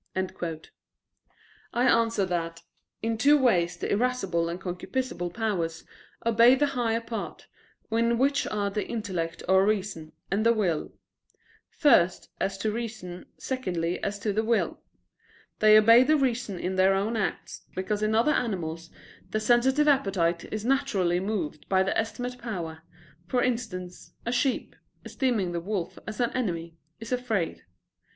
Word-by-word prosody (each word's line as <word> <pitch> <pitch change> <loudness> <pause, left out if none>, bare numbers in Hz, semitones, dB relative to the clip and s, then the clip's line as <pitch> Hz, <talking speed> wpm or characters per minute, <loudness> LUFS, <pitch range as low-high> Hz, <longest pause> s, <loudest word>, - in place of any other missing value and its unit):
I 185 +5 -7
answer 230 -5 +3
that, 165 -2 -3 0.4
In 225 0 -1
two 290 +4 +6
ways 180 -10 +2
the - - -3
irascible 200 -7 0
and 170 +1 -4
concupiscible 180 +1 -3
powers 175 -7 -2 0.4
obey 230 +2 +6
the 290 - +2
higher 230 -3 +1
part, 230 -1 -6 0.5
in 230 +1 +2
which 280 +3 +2
are 205 -1 -1
the 210 +1 -2
intellect 185 -8 -3
or 190 +1 +5
reason, 195 -6 -1 0.2
and 200 +3 +1
the 230 +1 +5
will; 180 -8 0 0.8
first, 210 - +3
as 195 0 -1
to 215 +2 -1
reason, 215 -6 -6
secondly 180 -10 -2
as 200 0 -2
to 210 -1 0
the 220 +2 +1
will. 230 0 0 0.8
They 215 0 +7
obey 230 +3 +8
the 305 +4 +3
reason 245 -7 -1
in 185 +2 -3
their 190 +1 +5
own 205 +4 0
acts, 215 -3 -3
because 205 +3 -2
in 215 +1 +1
other 235 +7 +4
animals 170 - -2 0.4
the 215 - -1
sensitive 250 +6 +3
appetite 190 - +1
is 215 0 -4
naturally 225 -10 +1
moved 185 -7 -3
by 190 -1 +4
the 190 - -1
estimative 245 +3 -3
power; 170 -9 -5 0.5
for 245 +4 +1
instance, 210 -8 -4
a 235 - -1
sheep, 250 +2 0 0.3
esteeming 235 -10 0
the 170 -1 -3
wolf 190 -1 -4
as 215 +2 -6
an 240 -1 +1
enemy, 170 -9 -3 0.2
is 225 +1 -8
afraid. 225 -9 -1
215 Hz, 145 wpm, -27 LUFS, 180-235 Hz, 0.8 s, obey